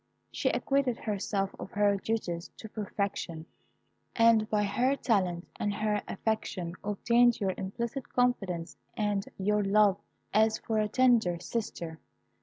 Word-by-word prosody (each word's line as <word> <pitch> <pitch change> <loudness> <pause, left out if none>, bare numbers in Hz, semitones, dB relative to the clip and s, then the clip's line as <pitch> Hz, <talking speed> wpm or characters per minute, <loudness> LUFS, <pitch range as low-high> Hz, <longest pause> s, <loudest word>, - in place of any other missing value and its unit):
She - - 0
acquitted 270 -4 +1
herself 200 -2 -2
of - - -6
her 205 -1 +3
duties 190 -5 -3
to 220 - -8
perfection, 200 -6 -3 0.7
and 230 -2 +5
by 210 -1 +2
her 245 +7 +1
talent 185 -9 0
and 205 - 0
her 210 -1 0
affection 195 -5 -2
obtained 235 +4 +3
your 190 -2 0
implicit 235 +7 -4
confidence 195 -9 0 0.2
and 205 -2 0
your 210 +2 +1
love 200 0 +4 0.3
as 220 0 +4
for 220 -1 -1
a 215 - +2
tender 225 -7 +3
sister. 170 -7 -4
210 Hz, 130 wpm, -30 LUFS, 195-225 Hz, 0.7 s, and